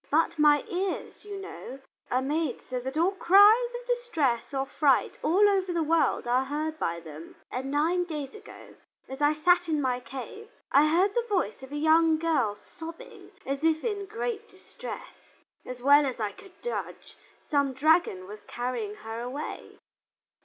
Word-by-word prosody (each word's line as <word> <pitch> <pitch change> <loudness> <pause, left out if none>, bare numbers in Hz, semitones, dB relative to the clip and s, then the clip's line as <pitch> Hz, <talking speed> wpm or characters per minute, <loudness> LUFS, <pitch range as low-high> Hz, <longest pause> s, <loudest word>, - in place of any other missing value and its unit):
But 315 +1 +1
my 295 -1 +5
ears, 370 +1 -4
you 405 -1 -6
know, 385 -8 -9 0.3
are 255 +1 +1
made 295 -1 -2
so 255 -1 -4
that 265 +4 -5
all 345 +4 +3
cries 410 +6 +6
of - - -14
distress 385 - -1
or 270 -1 -1
fright 275 -1 +1
all 390 +6 +4
over 385 -2 +1
the 335 -2 0
world 320 -3 +1
are 250 +2 +2
heard 310 +3 -3
by 170 0 -1
them. 160 0 -11 0.2
And 260 +2 -4
nine 330 +5 +1
days 300 -5 -5
ago, 430 0 -13 0.3
as 265 +2 -8
I 295 +1 +4
sat 350 +3 +3
in 310 -2 +1
my 255 -3 0
cave, 270 - -9 0.2
I 290 +2 +6
heard 365 +6 +3
the 475 +1 -1
voice 385 -8 -1
of 265 +1 -11
a - - -5
young 320 +1 +4
girl 305 -10 +1
sobbing 330 +8 -11 0.2
as 275 +2 -3
if 320 -1 +2
in 405 -4 -2
great 440 +1 -4
distress. 380 +6 -11 0.3
As 250 -1 -7
well 285 +1 +6
as 255 - -4
I 210 -2 -1
could 390 -2 -17
judge, 485 - -5 0.3
some 280 -3 +1
dragon 290 - +2
was 210 +2 -10
carrying 240 -4 -3
her 225 +1 -7
away." 260 +5 -6
305 Hz, 175 wpm, -28 LUFS, 265-365 Hz, 0.3 s, cries